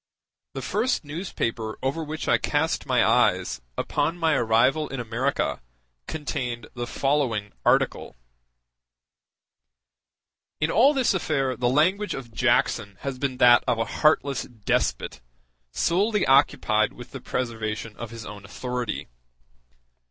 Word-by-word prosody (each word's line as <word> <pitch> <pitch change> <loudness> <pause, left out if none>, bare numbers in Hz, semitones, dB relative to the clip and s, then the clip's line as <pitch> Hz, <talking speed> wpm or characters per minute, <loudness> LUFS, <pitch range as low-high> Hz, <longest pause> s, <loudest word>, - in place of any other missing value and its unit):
The - - -4
first 255 - 0
newspaper 120 - -3
over 140 +5 -1
which 155 +1 -5
I - - +4
cast - - 0
my - - +3
eyes, - - +2 0.2
upon 165 - -1
my 165 -2 +2
arrival 125 +5 +2
in 135 - -5
America, 120 +4 -1 0.5
contained 125 -6 -4
the 120 0 -4
following 125 -9 0
article: - - +1 2.4
In 150 +2 +1
all 275 +6 +5
this 260 -6 +2
affair 140 -8 0
the 120 -1 0
language 185 +10 +2
of 120 -4 -8
Jackson 115 -4 +1
has 135 -2 -4
been 130 -2 -2
that 120 -1 +6
of 125 -2 +2
a 115 - 0 0.2
heartless 145 -4 +3
despot, 105 - -2 0.5
solely 200 - +1
occupied 110 -5 +3
with 120 0 -11
the 135 - -8
preservation 115 -3 -3
of 120 - -6
his 115 -1 -9
own 105 -1 -9
authority. 125 +3 -4
125 Hz, 125 wpm, -25 LUFS, 115-150 Hz, 2.4 s, that